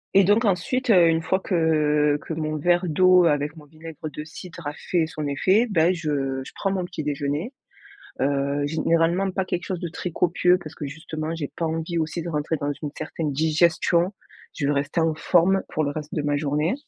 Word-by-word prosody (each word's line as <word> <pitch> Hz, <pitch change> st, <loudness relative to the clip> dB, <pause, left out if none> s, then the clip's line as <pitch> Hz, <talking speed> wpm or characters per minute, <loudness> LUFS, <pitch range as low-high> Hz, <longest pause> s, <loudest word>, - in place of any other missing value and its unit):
Et 195 Hz, -, +7 dB
donc 205 Hz, +5 st, +3 dB
ensuite, 225 Hz, +7 st, +1 dB
heu, 180 Hz, -5 st, +6 dB
une 165 Hz, 0 st, +2 dB
fois 190 Hz, +2 st, +1 dB
que 150 Hz, -5 st, +2 dB
que -, -, -6 dB
mon 155 Hz, -1 st, -2 dB
verre 175 Hz, +4 st, +2 dB
d'eau 185 Hz, +2 st, +5 dB
avec 150 Hz, -1 st, +1 dB
mon 155 Hz, -2 st, -13 dB
vinaigre 155 Hz, 0 st, -9 dB
de 150 Hz, -, -7 dB
cidre 165 Hz, +1 st, -9 dB
a 145 Hz, -, -3 dB
fait 165 Hz, +1 st, -1 dB
son 155 Hz, -1 st, -5 dB
effet, 190 Hz, -, +3 dB
beh, 170 Hz, 0 st, +3 dB
je 140 Hz, -5 st, -2 dB
je -, -, -11 dB
prends 195 Hz, -, -1 dB
mon 185 Hz, -2 st, -1 dB
petit 175 Hz, -2 st, -6 dB
déjeuner. 145 Hz, -, -2 dB, 0.7 s
Heu, 140 Hz, +1 st, 0 dB
généralement, 165 Hz, +4 st, +1 dB
pas 190 Hz, 0 st, -1 dB
quelque 180 Hz, -1 st, -3 dB
chose 185 Hz, -2 st, -3 dB
de 175 Hz, -, -3 dB
très 180 Hz, +1 st, -5 dB
copieux 180 Hz, +2 st, +3 dB
parce 160 Hz, -4 st, -10 dB
que 150 Hz, -, -6 dB
justement, 155 Hz, +2 st, -5 dB
j'ai 150 Hz, -4 st, -5 dB
pas 165 Hz, -, -2 dB
envie 165 Hz, +1 st, -2 dB
aussi 160 Hz, +1 st, -2 dB
de 170 Hz, -, -4 dB
rentrer 155 Hz, 0 st, -1 dB
dans 145 Hz, 0 st, -1 dB
une 150 Hz, -, -3 dB
certaine 155 Hz, -3 st, -3 dB
digestion. 165 Hz, +4 st, +2 dB, 0.4 s
Je 145 Hz, -, -1 dB
veux 145 Hz, -, +2 dB
rester 145 Hz, +4 st, -1 dB
en 160 Hz, -1 st, +2 dB
forme 185 Hz, +4 st, +3 dB
pour 155 Hz, -, -1 dB
le 145 Hz, -, -1 dB
reste 150 Hz, 0 st, -7 dB
de 150 Hz, -, 0 dB
ma 145 Hz, 0 st, +1 dB
journée. 150 Hz, +3 st, 0 dB
160 Hz, 210 wpm, -24 LUFS, 150-175 Hz, 0.7 s, Et